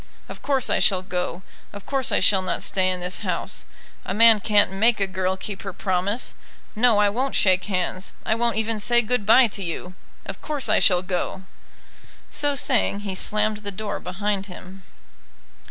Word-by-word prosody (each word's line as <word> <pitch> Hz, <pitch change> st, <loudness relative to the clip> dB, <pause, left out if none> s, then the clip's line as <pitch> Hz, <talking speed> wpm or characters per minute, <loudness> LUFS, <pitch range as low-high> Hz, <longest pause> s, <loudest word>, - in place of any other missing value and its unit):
Of -, -, -10 dB
course 275 Hz, -3 st, +1 dB
I -, -, +1 dB
shall 185 Hz, -2 st, +2 dB
go. 180 Hz, -1 st, -4 dB, 0.3 s
Of 200 Hz, -1 st, -11 dB
course 270 Hz, -3 st, -1 dB
I -, -, +2 dB
shall 195 Hz, -2 st, +3 dB
not 185 Hz, -, -3 dB
stay 185 Hz, -1 st, +1 dB
in 180 Hz, -1 st, -2 dB
this 180 Hz, +1 st, -3 dB
house. -, -, -3 dB, 0.4 s
A 190 Hz, -, -4 dB
man 225 Hz, 0 st, +7 dB
can't 205 Hz, -2 st, +3 dB
make 215 Hz, +4 st, +2 dB
a 195 Hz, -, +2 dB
girl 190 Hz, 0 st, -2 dB
keep 195 Hz, +1 st, -6 dB
her 195 Hz, -2 st, -7 dB
promise. 195 Hz, +5 st, -2 dB, 0.4 s
No 225 Hz, 0 st, +4 dB
I 205 Hz, 0 st, +4 dB
won't 255 Hz, +7 st, -2 dB
shake 185 Hz, -1 st, +3 dB
hands. 185 Hz, -1 st, -3 dB
I -, -, +1 dB
won't 235 Hz, +1 st, 0 dB
even 220 Hz, 0 st, -1 dB
say 240 Hz, +3 st, +3 dB
good 220 Hz, -2 st, -1 dB
bye 250 Hz, +4 st, +7 dB
to 200 Hz, -1 st, -5 dB
you. 180 Hz, +1 st, -6 dB, 0.3 s
Of -, -, -8 dB
course 295 Hz, -3 st, -2 dB
I -, -, +4 dB
shall 180 Hz, -2 st, +3 dB
go." 185 Hz, +1 st, -4 dB, 0.9 s
So 290 Hz, -1 st, -1 dB
saying 245 Hz, -7 st, +1 dB
he 200 Hz, -2 st, -5 dB
slammed 210 Hz, +3 st, 0 dB
the 205 Hz, -1 st, -6 dB
door 205 Hz, +1 st, -5 dB
behind 195 Hz, +2 st, -3 dB
him. 185 Hz, +1 st, -12 dB
205 Hz, 185 wpm, -23 LUFS, 185-225 Hz, 0.9 s, man